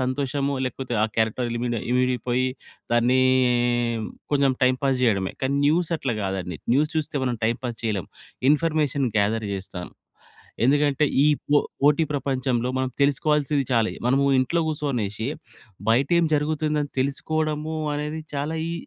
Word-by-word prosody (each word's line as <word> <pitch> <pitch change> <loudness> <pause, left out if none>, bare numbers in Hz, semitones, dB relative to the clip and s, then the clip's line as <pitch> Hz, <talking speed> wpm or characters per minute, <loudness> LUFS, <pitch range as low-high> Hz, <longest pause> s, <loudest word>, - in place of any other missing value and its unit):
సంతోషము 140 +2 -1
లేకపోతే 130 -1 -4
ఆ - - +2
క్యారెక్టర్ 110 +2 0
లిమిడి 120 -2 -2
ఇమిడిపోయి 125 0 +1 0.5
దాన్నీ 125 +2 +3 1.1
కొంచెం 140 -1 +4
టైమ్ 130 0 +2
పాస్ 135 -2 +2
జేయడమే. 100 -5 +1
కానీ 135 +1 +1
న్యూస్ 165 +2 +2
అట్లా 125 -5 -2
కాదండీ. 90 -4 -3 0.2
న్యూస్ 150 +2 +2
చూస్తే 155 -1 -2
మనం 125 -2 -1
టైమ్ 115 +2 0
పాస్ 120 -2 -4
చేయలేం. 105 -6 -2 0.4
ఇన్ఫర్మేషన్ 150 -3 +1
గ్యా‌ధర్ 105 +1 +1
జేస్తా‌ను. 95 -2 -7 0.7
ఎందుకంటే 145 +2 +3 0.2
ఈ - - +4 0.2
పొ 145 - +5 0.2
పోటీ 150 +3 +4
ప్రపంచంలో 130 -3 -1
మనం 130 -1 0
తెలుసుకోవాల్సింది 145 0 +2
చాలై 115 -2 +2
మనము 135 +3 +3
ఇంట్లో 150 +7 +1
కూచోనేసి 125 -8 -2 0.6
బయటేం 140 +9 +3
జరుగుతుందని 150 0 0
తెలుసుకోవడము 155 +3 -1 0.2
అనేది 150 +2 -3
చాలా 150 +3 -2 0.2
ఈ - - -2
135 Hz, 130 wpm, -24 LUFS, 120-150 Hz, 1.1 s, పొ